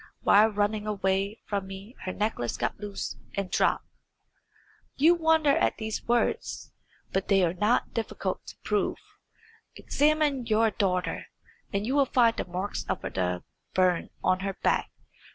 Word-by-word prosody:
While 215 +2 +6
running 210 0 -1
away 195 +1 0
from 200 -2 -2
me 195 +5 -9
her 185 - -1
necklace 120 - -2
got - - -2
loose 205 -1 -5 0.2
and 195 -2 -3
dropped. - - +2 1.1
You 320 +5 +6
wonder 320 -4 +3
at - - +1
these 220 -1 -4
words, 240 0 0 0.4
but 195 - 0
they 195 -2 +4
are 165 - 0
not 210 +6 +1
difficult 230 - -3
to - - -10
prove. - - 0 0.8
Examine 295 -4 +1
your 220 0 +3
daughter, 185 -3 -1 0.4
and 200 0 -1
you 255 - -1
will 280 -1 +4
find 235 -3 +4
the - - -3
marks 185 +3 -3
of - - -2
the 90 -1 -2 0.3
burn 185 -2 +2
on 185 - +3
her 195 +1 -2
back. - - +2
205 Hz, 150 wpm, -28 LUFS, 190-235 Hz, 1.1 s, While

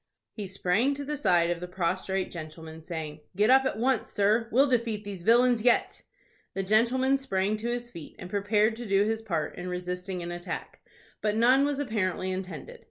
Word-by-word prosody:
He 210 -3 -5
sprang 195 +8 +1
to 285 0 -6
the 300 +2 -2
side 175 -10 +3
of 175 - -2
the 180 - -6
prostrate 185 +1 -1
gentleman, 160 -1 -8
saying, 160 -2 -6 0.2
"Get 210 +5 +4
up 265 +1 +6
at 265 - -1
once, 250 +1 +1
sir. 215 +3 +2
We'll 265 +5 +5
defeat 230 -5 0
these 200 -3 -6
villains 240 +3 +4
yet." 245 +1 +2 0.5
The 195 - -1
gentleman 250 +7 +3
sprang 200 -5 0
to 230 +3 -3
his 240 0 -3
feet, 165 -7 -10
and 180 - -8
prepared 210 +3 +1
to 240 -1 -6
do 200 0 +3
his 220 +1 -1
part 170 -9 -2
in 180 - -5
resisting 180 0 -4
an 170 - -5
attack; 175 +1 -6 0.4
but 210 -1 0
none 255 +5 +5
was 290 -1 -1
apparently 195 -8 -1
intended. 185 -6 -6
205 Hz, 190 wpm, -28 LUFS, 180-240 Hz, 0.5 s, up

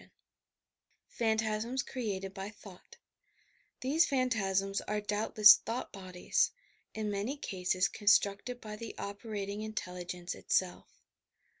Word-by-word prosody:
YOUR - - -18
PSYCHIC - - -34 1.0
POWERS - - -21
PHANTASMS 220 +2 0
CREATED 195 -6 -4
BY 195 0 -5
THOUGHT 210 - -14 0.8
These 305 +7 +3
phantasms 195 -7 0
are 210 0 -2
doubtless 210 0 +6
thought 235 +3 -5
bodies, 185 - 0 0.5
in 215 -1 -2
many 205 +8 -2
cases 185 -4 0
coDstnieted 205 +4 +2
by 210 -2 -8
the 230 0 -7
operating 200 0 -5
intelligence 180 -4 -5
itself. 185 -1 -2
210 Hz, 115 wpm, -32 LUFS, 195-225 Hz, 1.0 s, doubtless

